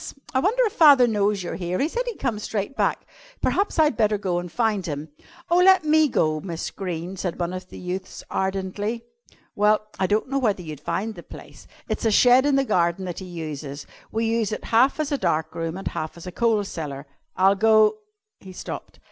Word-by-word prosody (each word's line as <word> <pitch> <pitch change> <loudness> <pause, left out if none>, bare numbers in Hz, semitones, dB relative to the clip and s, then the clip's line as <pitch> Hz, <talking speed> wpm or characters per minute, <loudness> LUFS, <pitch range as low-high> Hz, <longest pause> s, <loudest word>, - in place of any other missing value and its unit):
I 260 - +3
wonder 445 - +2
if 425 - -2
father 285 -6 +7
knows 205 -3 +1
you're 175 - -4
here. 180 0 -2
He 280 - +1
said 475 +9 -2
he'd 475 - -4
come 215 -3 -2
straight 210 +4 -3
back. - - 0 0.3
Perhaps 400 -1 0
I'd 305 -5 +4
better 215 -1 +2
go 180 -3 -1
and 175 -1 -7
find 220 -3 0
him." 155 -2 -5 0.4
"Oh, 350 - +5
let 380 -1 +6
me 310 0 +4
go, 155 - +1
Miss 170 -1 -5
Greene," 180 -1 -5
said 180 -2 -4
one 175 +1 -2
of 185 0 -7
the - - -10
youths 185 +1 -6
ardently. 195 +4 -2 0.5
"Well, 210 +1 +2
I 190 - +2
don't 210 +5 +1
know 275 +1 0
whether 205 -7 0
you'd 155 -3 -7
find 220 +8 -3
the 175 - -10
place. - - -13 0.2
It's - - -3
a 225 - +3
shed 250 +5 +5
in 285 - +3
the 275 0 +2
garden 175 -2 +1
that 175 -2 -5
he 190 - -8
uses. 155 -5 -6 0.3
We 225 +1 -1
use 225 -1 0
half 250 +6 +3
as 305 -1 -1
a 285 - 0
dark 160 +1 0
room 165 +1 -4
and 195 - -6
half 155 +2 -5
as 170 - -11
a 180 - -6
coal 225 +1 +1
cellar." 145 -7 -6 0.3
"I'll 190 +1 +5
go 215 - +4 0.2
" 430 +1 -62
He 190 -1 -12
stopped. - - -8
205 Hz, 215 wpm, -24 LUFS, 175-245 Hz, 0.5 s, father